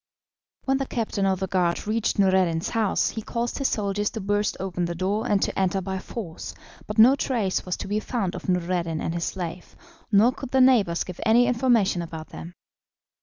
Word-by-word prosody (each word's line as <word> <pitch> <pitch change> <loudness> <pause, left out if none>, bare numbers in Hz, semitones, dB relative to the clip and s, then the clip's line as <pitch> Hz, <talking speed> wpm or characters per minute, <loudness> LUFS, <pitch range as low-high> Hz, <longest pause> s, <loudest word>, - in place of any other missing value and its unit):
When 270 0 +2
the 270 - -2
captain 210 -4 -1
of 190 -1 +1
the 190 - -1
guard 180 -3 0
reached 220 +2 0
Noureddin's 185 -4 +2
house 220 -4 +1
he 220 - -5
caused 235 +4 -3
his 275 - +2
soldiers 205 -1 -1
to 225 - -6
burst 205 +1 0
open 180 -2 -2
the 170 0 -4
door 195 +5 -1
and 205 - +3
to - - -2
enter 190 0 +1
by 190 0 -4
force, 185 -4 -7 0.3
but 210 - -5
no 240 +5 +8
trace 225 -10 -1
was 180 - -2
to - - -6
be 205 +2 0
found 215 -5 -2
of - - -6
Noureddin 175 -2 0
and 165 - -2
his 170 -1 -2
slave, 175 -2 -6 0.4
nor 215 +4 +5
could 265 0 -8
the 265 - +2
neighbours 230 -10 +4
give 180 -2 -9
any 235 +2 +5
information 235 -7 +2
about 160 -1 -7
them. 170 +2 -9
195 Hz, 200 wpm, -25 LUFS, 180-225 Hz, 0.4 s, no